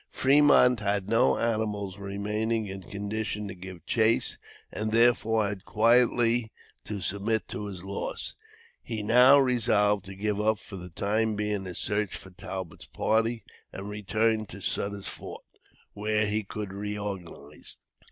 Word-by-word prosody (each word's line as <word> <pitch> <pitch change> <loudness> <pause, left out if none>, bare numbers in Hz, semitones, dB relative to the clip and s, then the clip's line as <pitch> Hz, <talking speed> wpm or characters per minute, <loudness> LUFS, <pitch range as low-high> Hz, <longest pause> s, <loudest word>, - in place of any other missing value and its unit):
Fremont 135 -3 +5
had 100 -2 -1
no 65 -12 +3
animals 105 -4 -2
remaining 105 +3 -2
in 95 -1 -7
condition 105 +2 -4
to 95 - -6
give 90 -2 -10
chase, 115 0 +2 0.3
and 110 +1 -2
therefore 115 -2 +3
had 100 -2 -5
quietly 115 +1 +3 0.3
to 105 -2 -5
submit 100 +4 -1
to 105 - -5
his 95 -3 -7
loss. 100 +1 -4 0.5
He 110 -3 -4
now 125 +6 +7
resolved 110 -6 +2
to 95 0 -9
give 105 +1 -1
up 110 0 +2
for 100 -1 -10
the 90 0 -9
time 105 +5 0
being 105 -2 -2
his 90 -2 -6
search 105 -1 -1
for 95 - -9
Talbot's 95 -1 -7
party 115 +1 0 0.3
and 100 +2 -7
return 110 +1 0
to 100 - -9
Sutter's 100 +2 -2
Fort, - - -8 0.5
where 105 +1 0
he 105 +1 0
could 105 -1 -6
reorganize. 100 -7 -6
105 Hz, 140 wpm, -28 LUFS, 100-110 Hz, 0.5 s, now